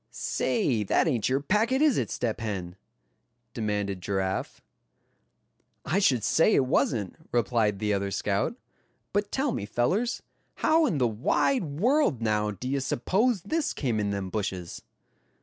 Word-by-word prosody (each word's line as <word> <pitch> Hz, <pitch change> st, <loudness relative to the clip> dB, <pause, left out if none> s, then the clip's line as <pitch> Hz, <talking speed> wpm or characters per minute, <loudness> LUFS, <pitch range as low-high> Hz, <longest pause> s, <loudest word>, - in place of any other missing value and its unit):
"Say, 140 Hz, -, 0 dB
that 95 Hz, -, +2 dB
ain't 125 Hz, -8 st, +1 dB
your 135 Hz, +2 st, +1 dB
package, 220 Hz, -, +1 dB
is 300 Hz, -6 st, +4 dB
it, 115 Hz, -, -2 dB
Step 120 Hz, -2 st, -2 dB
Hen?" 95 Hz, -6 st, -4 dB, 0.8 s
demanded 105 Hz, -4 st, -2 dB
Giraffe. 95 Hz, 0 st, -2 dB, 1.3 s
"I 165 Hz, +8 st, +1 dB
should 130 Hz, -, +3 dB
say 165 Hz, -, +4 dB
it 135 Hz, -, +3 dB
wasn't;" 115 Hz, -, 0 dB, 0.2 s
replied 115 Hz, -3 st, +1 dB
the 105 Hz, 0 st, 0 dB
other 100 Hz, 0 st, -1 dB
scout; 100 Hz, -, -1 dB, 0.6 s
"but 205 Hz, 0 st, 0 dB
tell 270 Hz, 0 st, 0 dB
me, 100 Hz, -, -4 dB
fellers, 195 Hz, -, 0 dB, 0.3 s
how 315 Hz, 0 st, +3 dB
in 160 Hz, -, 0 dB
the 125 Hz, -3 st, +3 dB
wide 145 Hz, -, +1 dB
world 190 Hz, -, +1 dB
now, 105 Hz, -2 st, 0 dB
d'ye 125 Hz, +8 st, -3 dB
suppose 190 Hz, -, 0 dB
this 315 Hz, +8 st, -1 dB
came 120 Hz, -6 st, -1 dB
in 105 Hz, -1 st, 0 dB
them 100 Hz, -2 st, -3 dB
bushes?" 95 Hz, -5 st, -4 dB
120 Hz, 145 wpm, -27 LUFS, -, 1.3 s, is